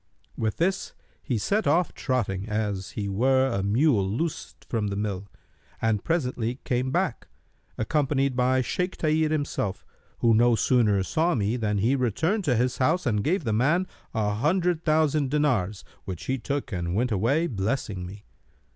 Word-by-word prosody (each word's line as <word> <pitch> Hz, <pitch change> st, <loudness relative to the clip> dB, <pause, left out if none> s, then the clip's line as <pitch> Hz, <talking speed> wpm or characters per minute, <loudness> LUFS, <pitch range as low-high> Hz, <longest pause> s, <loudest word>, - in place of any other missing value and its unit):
With 110 Hz, -2 st, -2 dB
this 190 Hz, +3 st, 0 dB, 0.3 s
he 125 Hz, -5 st, -1 dB
set 205 Hz, -, 0 dB
off 165 Hz, +4 st, +2 dB
trotting, 110 Hz, -6 st, -2 dB
as 105 Hz, -3 st, -2 dB
he 100 Hz, -2 st, -3 dB
were 130 Hz, +7 st, +3 dB
a 100 Hz, -, 0 dB
mule 110 Hz, +3 st, +3 dB
loosed 150 Hz, +10 st, -4 dB
from 110 Hz, -3 st, -1 dB
the 100 Hz, -, -3 dB
mill, 100 Hz, -1 st, -3 dB, 0.5 s
and 110 Hz, -2 st, 0 dB
presently 125 Hz, -8 st, -1 dB
came 125 Hz, +1 st, 0 dB
back, -, -, -1 dB, 0.5 s
accompanied 135 Hz, +1 st, +1 dB
by 130 Hz, +1 st, +2 dB
Shaykh 180 Hz, +8 st, -2 dB
Tahir 155 Hz, 0 st, +2 dB
himself, 145 Hz, -10 st, -2 dB, 0.3 s
who 115 Hz, -1 st, +3 dB
no 120 Hz, +2 st, +5 dB
sooner 110 Hz, -5 st, +3 dB
saw 165 Hz, -, +1 dB
me 105 Hz, +1 st, 0 dB
than 105 Hz, -4 st, -1 dB
he 115 Hz, +7 st, +2 dB
returned 160 Hz, -, 0 dB
to 130 Hz, -5 st, +2 dB
his 125 Hz, +2 st, 0 dB
house 160 Hz, +7 st, +2 dB
and 105 Hz, -5 st, +1 dB
gave 175 Hz, +2 st, +1 dB
the 110 Hz, -4 st, -1 dB
man 150 Hz, +11 st, +2 dB, 0.3 s
an 105 Hz, -1 st, 0 dB
hundred 170 Hz, -, +1 dB
thousand 155 Hz, -3 st, +2 dB
dinars 125 Hz, -10 st, 0 dB, 0.2 s
which 95 Hz, -4 st, -6 dB
he 130 Hz, 0 st, -1 dB
took 140 Hz, +2 st, -3 dB
and 85 Hz, -2 st, -2 dB
went 120 Hz, +3 st, +1 dB
away 120 Hz, -, +2 dB
blessing 105 Hz, -, -2 dB
me. 100 Hz, +3 st, -9 dB
125 Hz, 165 wpm, -26 LUFS, 105-150 Hz, 0.5 s, no